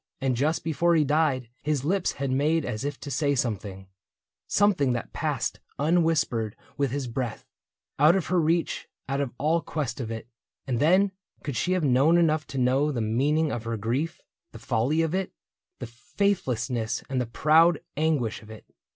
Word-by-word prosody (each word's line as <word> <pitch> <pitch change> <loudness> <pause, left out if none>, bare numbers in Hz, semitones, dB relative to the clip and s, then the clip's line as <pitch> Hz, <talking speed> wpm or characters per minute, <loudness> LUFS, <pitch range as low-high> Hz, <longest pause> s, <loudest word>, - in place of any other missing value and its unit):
And 135 -2 0
just 150 +6 0
before 165 +2 +2
he 155 - +4
died 145 -4 +1
His 145 -2 -1
lips 185 +3 +1
had 135 -1 -3
made 150 +4 +1
as 110 -1 -4
if 145 -1 -4
to 140 - -6
say 145 +2 +1
something 100 -6 -3 0.3
— - - -67 0.2
Something 180 -11 +3
that 120 - -5
passed - - -2 0.2
unwhispered 150 -8 +1 0.2
with 140 -1 0
his 140 +1 -3
breath, 120 -2 -4 0.5
Out 155 +5 +6
of 190 - 0
her 180 0 +2
reach, 165 +2 0 0.2
out 135 +1 -1
of 135 -4 -2
all 160 +4 +1
quest 140 -8 -4
of 115 - -4
it. 110 0 -6 0.4
And 125 -3 -1
then, 185 +7 +4 0.3
could 140 -5 -4
she 180 - 0
have 185 -3 0
known 140 +5 +4
enough 155 -2 +2
to 135 - -6
know 130 +4 +2
The 130 - -3
meaning 140 +8 +1
of 115 - -3
her 115 0 -2
grief, 125 +10 -2 0.3
the - - -8
folly 135 +9 0
of 160 0 -1
it. 190 0 -2 0.4
The 125 - -6 0.3
faithlessness 125 - 0
and 130 -2 -1
the 125 - -3
proud 160 +6 +4 0.2
anguish 145 -7 0
of 110 - -15
it. 110 -1 -11
140 Hz, 185 wpm, -26 LUFS, 125-160 Hz, 0.5 s, Out